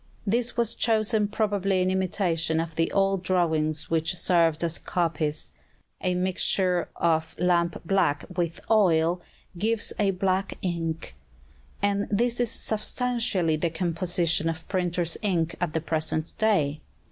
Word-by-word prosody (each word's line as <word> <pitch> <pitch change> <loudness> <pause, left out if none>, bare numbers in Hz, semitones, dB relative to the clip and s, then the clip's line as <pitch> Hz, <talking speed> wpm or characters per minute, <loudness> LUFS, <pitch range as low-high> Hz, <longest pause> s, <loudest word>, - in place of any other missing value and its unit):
This 235 +4 0
was 235 -2 +2
chosen 220 -1 +1
probably 200 -3 0
in 185 0 +2
imitation 175 -4 0
of 165 0 -3
the 165 0 +1
old 195 -1 +2
drawings 160 -4 0
which 165 +2 +1
served 170 -2 +2
as 170 -1 +1
copies. 155 -3 -2 0.5
A 180 -1 0
mixture 180 -1 +1
of 160 -1 0
lamp 170 -1 +1
black 160 -5 +1
with 170 -2 -1
oil 175 -5 +3 0.4
gives 220 +2 +1
a 205 -2 +3
black 190 0 0
ink; 165 -3 -3 0.7
and 200 0 +1
this 235 +4 +1
is 240 -2 +2
substantially 220 -7 0
the 170 +2 0
composition 170 -1 0
of 160 0 -6
printer's 175 -3 -1
ink 175 -5 0
at 170 -4 -1
the 160 - 0
present 160 0 -2
day. 155 -10 +2
180 Hz, 135 wpm, -26 LUFS, 165-200 Hz, 0.7 s, oil